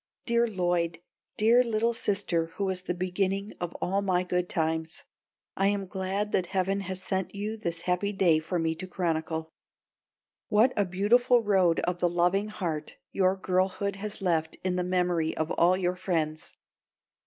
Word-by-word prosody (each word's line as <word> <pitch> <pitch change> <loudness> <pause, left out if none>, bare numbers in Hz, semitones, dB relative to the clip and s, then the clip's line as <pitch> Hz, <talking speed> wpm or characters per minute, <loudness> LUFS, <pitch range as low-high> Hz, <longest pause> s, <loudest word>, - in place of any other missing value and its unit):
Dear 235 0 +2
Lloyd, 175 -4 0 0.4
dear 230 +4 +5
little 230 0 +1
sister 195 -6 0
who 200 - -1
was 190 -1 -1
the 180 -1 -3
beginning 190 +3 -1
of 175 -1 -4
all 195 +2 0
my 185 -2 +1
good 180 0 -1
times, 160 0 -2 0.5
I 195 - +2
am 200 -1 0
glad 190 +2 -2
that 180 -2 +1
heaven 195 +1 0
has 190 -1 -5
sent 190 0 -2
you 210 +2 -3
this 170 -6 -4
happy 180 +3 0
day 180 -5 +3
for 165 +3 -3
me 165 -1 0
to 185 - -6
chronicle! 160 -2 -2 1.0
What 225 +5 +4
a 205 - +2
beautiful 235 +7 +3
Road 190 -5 +3
of 175 0 -2
the 175 - +2
Loving 180 +4 +2
Heart 170 -7 -4
your 190 0 +2
girlhood 190 +1 0
has 205 0 -5
left 160 -3 0
in 185 -1 0
the 180 - 0
memory 180 -3 0
of 160 0 -1
all 180 +2 +3
your 180 -1 0
friends! 160 -4 -2
185 Hz, 165 wpm, -28 LUFS, 175-200 Hz, 1.0 s, dear